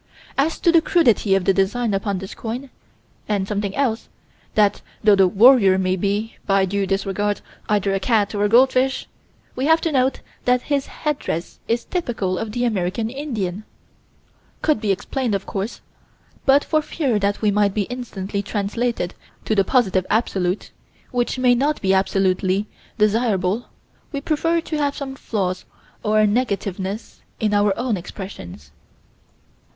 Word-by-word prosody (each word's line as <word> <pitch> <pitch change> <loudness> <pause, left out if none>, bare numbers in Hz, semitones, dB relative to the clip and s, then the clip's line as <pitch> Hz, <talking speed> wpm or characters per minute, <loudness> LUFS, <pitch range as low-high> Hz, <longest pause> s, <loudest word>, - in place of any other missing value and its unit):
As 295 +4 +1
to 340 - +5
the 335 -1 +5
crudity 240 - +3
of 195 - +1
design 200 +4 +1
upon 195 0 -1
this 190 +1 -7
coin, 245 +4 -6 0.6
and 200 -2 0
something 200 -1 -2
else 250 -5 -1 0.5
that, 205 -1 +3 0.2
though 210 -1 +6
the 195 -1 +5
"warrior" 200 -1 +6
may 185 0 +1
be, 205 +4 -2
by 195 -1 +3
due 195 +1 -1
disregards, 200 +1 -1 0.3
either 205 -2 +2
a 195 - +1
cat 210 0 +1
or 205 0 0
a 205 - +2
goldfish, 260 +3 +3 0.5
we 260 +3 -1
have 320 +1 +5
to 330 - 0
note 265 -1 +1 0.2
that 250 0 +3
his 285 -2 -1
headdress 280 - -3
is 235 +1 0
typical 225 - -2
of 225 -1 -4
the 245 - -1
American 215 +1 -1
Indian 220 -9 -4 1.0
could 305 -8 +2
be 210 -3 +1
explained, 220 +4 -1
of 195 - -3
course, 200 +4 -4 0.7
but 275 +2 +6
for 310 - +1
fear 275 -7 -1
that 200 +2 -1
we 210 - +4
might 205 -1 +2
be 210 - +1
instantly 200 -4 -4
translated 205 -1 -2 0.3
to - - +1
the 200 -2 +4
Positive 190 -5 +2
Absolute, 195 -4 0 0.4
which 245 +1 0
may 255 -1 +4
not 285 +5 +1
be 190 -1 +2
absolutely 190 0 +1 0.3
desirable, 210 -1 +1 0.4
we 280 - -2
prefer 330 +3 0
to 315 -1 -4
have 285 -1 0
some 275 -2 -5
flaws 185 -8 -2 0.4
or 215 0 +3
negativeness 205 -2 -2 0.2
in 210 -1 +1
our 205 0 +3
own 240 -3 0
expressions. 90 - -9
210 Hz, 155 wpm, -21 LUFS, 195-250 Hz, 1.0 s, though